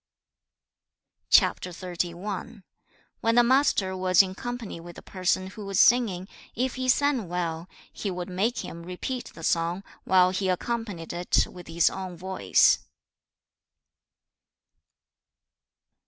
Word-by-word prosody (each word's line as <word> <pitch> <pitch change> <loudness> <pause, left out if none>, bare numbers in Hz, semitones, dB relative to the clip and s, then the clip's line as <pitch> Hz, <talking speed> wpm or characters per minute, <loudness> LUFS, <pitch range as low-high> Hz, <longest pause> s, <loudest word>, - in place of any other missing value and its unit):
CHAP. - - +5
XXXI. 180 +3 -5 0.6
When 230 0 +1
the 240 - +6
Master 240 -7 +2
was 185 0 +5
in 185 -1 -5
company 240 -3 -6
with 170 0 -11
a - - -11
person 185 0 -1
who 210 - -9
was 195 -1 0
singing, 205 -7 +4 0.3
if 255 +2 -1
he 255 0 -2
sang 260 -7 +2
well, 170 -1 -3 0.2
he 205 - -4
would 180 -1 -4
make 200 +7 -1
him 170 - -8
repeat 185 +9 -5
the 165 - -10
song, 170 +4 0 0.2
while 185 -1 +4
he 190 0 -1
accompanied 200 -3 -3
it 175 +1 +2
with 180 -2 -12
his 165 +1 +2
own 185 -2 -6
voice. 190 +2 +3
185 Hz, 125 wpm, -26 LUFS, 175-225 Hz, 0.6 s, the